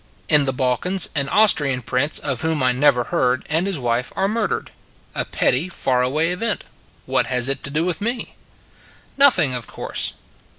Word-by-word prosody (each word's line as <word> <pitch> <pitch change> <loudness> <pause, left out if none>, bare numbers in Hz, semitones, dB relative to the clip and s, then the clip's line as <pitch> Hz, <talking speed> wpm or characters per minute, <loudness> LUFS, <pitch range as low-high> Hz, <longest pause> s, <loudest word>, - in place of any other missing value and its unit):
In 150 -3 +4
the 135 - 0
Balkans, 135 +9 0
an 140 -2 -1
Austrian 145 - +4
prince 135 +6 0
of 135 -5 -3
whom 160 -4 -1
I 125 - +3
never 125 -1 +2
heard, 125 +1 -1
and 165 +5 0
his 195 -4 -1
wife, 120 -1 -2
are 195 - 0
mur 215 0 -1
dered. - - -4 0.4
A - - -3
petty 145 +9 0
far 130 -7 0
away 155 +7 0
event: 200 +1 -1 0.4
what - - 0
has 125 -1 +2
it 135 - -2
to - - -1
do 155 +4 -1
with 180 -1 -2
me? 235 +3 -3 0.8
Nothing, 265 - +5
of 125 -2 -3
course. - - -3
145 Hz, 180 wpm, -20 LUFS, 125-180 Hz, 0.8 s, Nothing